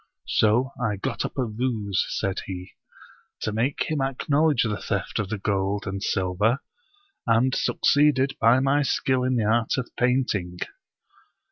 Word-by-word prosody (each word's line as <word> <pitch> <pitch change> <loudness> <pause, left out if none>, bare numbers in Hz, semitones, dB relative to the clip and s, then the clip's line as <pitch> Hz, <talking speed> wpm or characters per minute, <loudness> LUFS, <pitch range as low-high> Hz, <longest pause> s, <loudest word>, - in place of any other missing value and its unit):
" - - -44
So 120 +5 +3
I 110 -4 0
got 120 +5 -3
up - - -6
a 130 - +1
ruse," 110 -4 -1
said 95 -2 -2
he, 90 -1 -7 0.4
" - - -29
to 110 - -1
make 120 +6 0
him 155 -3 -2
acknowledge 140 +1 +2
the 105 -2 -2
theft 100 +3 -2
of 105 -3 -2
the 110 - -2
gold 100 0 -1
and 95 -1 -4
silver, 100 +4 +1 0.7
and 120 +3 +3
succeeded 140 -2 +2
by 115 +3 +5
my 140 +2 +2
skill 130 -2 +1
in 130 0 +1
the 115 -3 +1
art 110 +1 +1
of 130 - -3
painting." 125 -8 0
115 Hz, 160 wpm, -25 LUFS, 100-130 Hz, 0.7 s, by